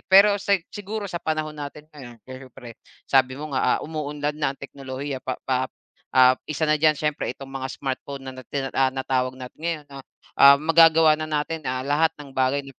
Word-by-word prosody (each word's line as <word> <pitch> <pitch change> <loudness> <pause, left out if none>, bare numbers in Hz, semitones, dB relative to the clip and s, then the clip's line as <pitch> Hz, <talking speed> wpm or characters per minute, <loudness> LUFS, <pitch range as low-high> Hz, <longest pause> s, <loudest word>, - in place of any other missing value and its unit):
Pero 200 +2 +7
sa 200 0 +3 0.2
siguro 205 +1 -5
sa 175 -3 -5
panahon 155 -1 -2
natin 150 0 -8
ngayon, 130 -5 -11
siyempre 130 -2 -11 0.3
sabi 130 -1 +2
mo 150 0 -7
nga, 130 - +2
ah, - - -4
umuunlad 150 -1 -3
na 135 -2 0
ang - - -55
teknolohiya. 135 0 -6
Pa 130 0 -4
pa 130 0 0 0.5
ah, 130 0 +8 0.2
isa 155 +1 -1
na 155 - +3
diyan 155 -1 +4
siyempre 150 -1 -2
itong 135 - -10
mga 130 -1 -4
smartphone, 140 0 -5
na 130 - -6
na - - -12
tina 140 -2 -2
ah, 135 -1 +3
natawag 130 -1 -1
natin 125 +3 -10
ngayon 165 -3 -2
na, 135 - -8 0.4
ah, 140 0 +10
magagawa 165 0 +6
na 155 - -3
natin, 155 +2 -2
ah, 130 +1 -2
lahat 155 +3 +3
ng 140 -2 -11
bagay 130 +2 +1
140 Hz, 195 wpm, -24 LUFS, 130-155 Hz, 0.5 s, ah